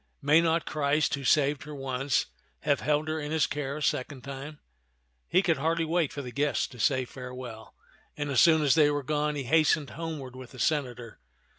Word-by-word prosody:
May 150 Hz, +3 st, +4 dB
not 165 Hz, 0 st, +1 dB
Christ, 150 Hz, 0 st, +1 dB
who 140 Hz, -, -2 dB
saved 140 Hz, +1 st, +3 dB
her 150 Hz, +1 st, -8 dB
once, 135 Hz, 0 st, -1 dB, 0.4 s
have 145 Hz, -2 st, +1 dB
held 150 Hz, +1 st, 0 dB
her 155 Hz, 0 st, -2 dB
in 150 Hz, -1 st, -5 dB
his 155 Hz, -1 st, +2 dB
care 140 Hz, -1 st, -3 dB
a 150 Hz, -, -4 dB
second 130 Hz, -1 st, -1 dB
time? 140 Hz, +2 st, -8 dB, 0.4 s
" -, -, -45 dB
He 185 Hz, +3 st, +3 dB
could 170 Hz, -3 st, +2 dB
hardly 165 Hz, +3 st, 0 dB
wait 165 Hz, -2 st, 0 dB
for 145 Hz, -4 st, -6 dB
the 125 Hz, -, -7 dB
guests 145 Hz, +2 st, 0 dB
to 125 Hz, -, -13 dB
say 130 Hz, +2 st, +2 dB
farewell; 125 Hz, -3 st, -9 dB, 0.4 s
and 145 Hz, -1 st, -3 dB
as 130 Hz, -, +4 dB
soon 160 Hz, -2 st, +5 dB
as 140 Hz, -, +4 dB
they 150 Hz, -2 st, +5 dB
were 145 Hz, -1 st, -1 dB
gone, 150 Hz, +1 st, -1 dB
he 140 Hz, -, -3 dB
hastened 155 Hz, +1 st, +2 dB
homeward 150 Hz, -5 st, -6 dB
with 130 Hz, 0 st, -11 dB
the 130 Hz, -, -11 dB
senator. 125 Hz, -7 st, -2 dB
145 Hz, 205 wpm, -28 LUFS, 130-155 Hz, 0.4 s, soon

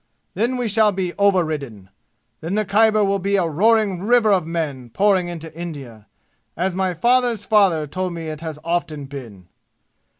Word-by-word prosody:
Then 245 Hz, +3 st, -1 dB
we 245 Hz, -2 st, -1 dB
shall 215 Hz, 0 st, +3 dB
be 185 Hz, -2 st, -3 dB
overridden. 155 Hz, -, 0 dB, 0.5 s
Then 165 Hz, +5 st, -4 dB
the 215 Hz, 0 st, 0 dB
Khyber 215 Hz, +2 st, +3 dB
will 200 Hz, 0 st, 0 dB
be 200 Hz, +2 st, 0 dB
a 185 Hz, -3 st, +2 dB
roaring 200 Hz, +2 st, +2 dB
river 225 Hz, +1 st, +3 dB
of 180 Hz, -4 st, 0 dB
men 150 Hz, -7 st, -4 dB
pouring 190 Hz, -, +2 dB
into 165 Hz, -2 st, -8 dB
India, 135 Hz, -11 st, -8 dB, 0.5 s
as 185 Hz, +2 st, -1 dB
my 185 Hz, -1 st, -1 dB
father's 240 Hz, +1 st, +1 dB
father 195 Hz, -8 st, +3 dB
told 185 Hz, +4 st, -4 dB
me 165 Hz, -1 st, -6 dB
it 155 Hz, -1 st, -6 dB
has 160 Hz, -2 st, -6 dB
often 160 Hz, -4 st, -2 dB
been! 120 Hz, -10 st, -10 dB
180 Hz, 165 wpm, -21 LUFS, 155-205 Hz, 0.5 s, shall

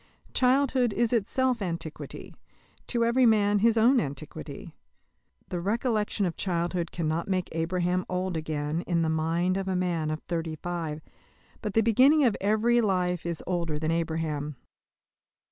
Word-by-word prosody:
Childhood 255 Hz, -2 st, +3 dB
is 235 Hz, +2 st, +1 dB
itself 245 Hz, +2 st, +1 dB
Antiquity 170 Hz, -4 st, -5 dB, 0.5 s
to 235 Hz, -2 st, +1 dB
every 245 Hz, +2 st, +4 dB
man 205 Hz, -2 st, +3 dB
his 230 Hz, +2 st, +3 dB
only 240 Hz, +2 st, +5 dB
Antiquity. 140 Hz, -, -7 dB, 0.8 s
The 180 Hz, -, -2 dB
recollection 215 Hz, +1 st, 0 dB
of 175 Hz, -, -2 dB
childhood 175 Hz, -1 st, -1 dB
cannot 165 Hz, 0 st, -2 dB
make 185 Hz, -2 st, -1 dB
Abraham 180 Hz, +2 st, 0 dB
old 185 Hz, 0 st, -2 dB
again 155 Hz, 0 st, -2 dB
in 170 Hz, -2 st, +1 dB
the 160 Hz, -, +1 dB
mind 165 Hz, +4 st, 0 dB
of 195 Hz, 0 st, -3 dB
a 190 Hz, -, 0 dB
man 175 Hz, -4 st, 0 dB
of 155 Hz, 0 st, -4 dB
thirty 165 Hz, -2 st, -3 dB
five; 160 Hz, -2 st, -4 dB, 0.6 s
but 210 Hz, -3 st, -4 dB
the 225 Hz, -, +5 dB
beginning 260 Hz, +7 st, +5 dB
of 235 Hz, -6 st, +3 dB
every 220 Hz, +4 st, +3 dB
life 180 Hz, -4 st, 0 dB
is 170 Hz, -2 st, -3 dB
older 170 Hz, -4 st, -1 dB
than 155 Hz, +1 st, -1 dB
Abraham. 160 Hz, -3 st, -2 dB
180 Hz, 145 wpm, -27 LUFS, 165-220 Hz, 0.8 s, only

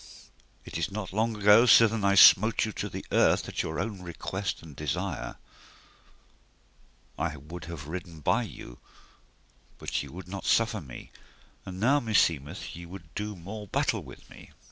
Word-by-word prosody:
It -, -, -5 dB
is 85 Hz, -, -1 dB
not 100 Hz, -2 st, -5 dB
long 110 Hz, +2 st, 0 dB
ago 105 Hz, +4 st, +6 dB
sithen 115 Hz, -3 st, +6 dB
I 100 Hz, 0 st, +3 dB
smote 110 Hz, +4 st, +7 dB
you 110 Hz, -, -4 dB
to -, -, -5 dB
the -, -, -7 dB
earth -, -, +3 dB
at -, -, -2 dB
your 80 Hz, 0 st, -4 dB
own 100 Hz, -1 st, -4 dB
request 95 Hz, +2 st, -5 dB
and 75 Hz, -4 st, -12 dB
desire: 75 Hz, -2 st, -3 dB, 1.8 s
I 80 Hz, -1 st, -2 dB
would 80 Hz, +4 st, -9 dB
have 80 Hz, -3 st, -8 dB
ridden 85 Hz, -1 st, -7 dB
by 115 Hz, +10 st, +2 dB
you, 80 Hz, -, -9 dB, 1.0 s
but -, -, -3 dB
ye 70 Hz, -, -8 dB
would 90 Hz, +3 st, -10 dB
not 95 Hz, +1 st, -7 dB
suffer 115 Hz, -1 st, +2 dB
me, 65 Hz, -5 st, -11 dB, 0.6 s
and 95 Hz, 0 st, -7 dB
now 135 Hz, +7 st, +3 dB
meseemeth 85 Hz, -, 0 dB
ye 85 Hz, 0 st, -9 dB
would 85 Hz, -3 st, -12 dB
do 105 Hz, 0 st, -4 dB
more 100 Hz, +4 st, -8 dB
battle -, -, 0 dB
with -, -, -13 dB
me. -, -, -14 dB
95 Hz, 165 wpm, -28 LUFS, 80-105 Hz, 1.8 s, smote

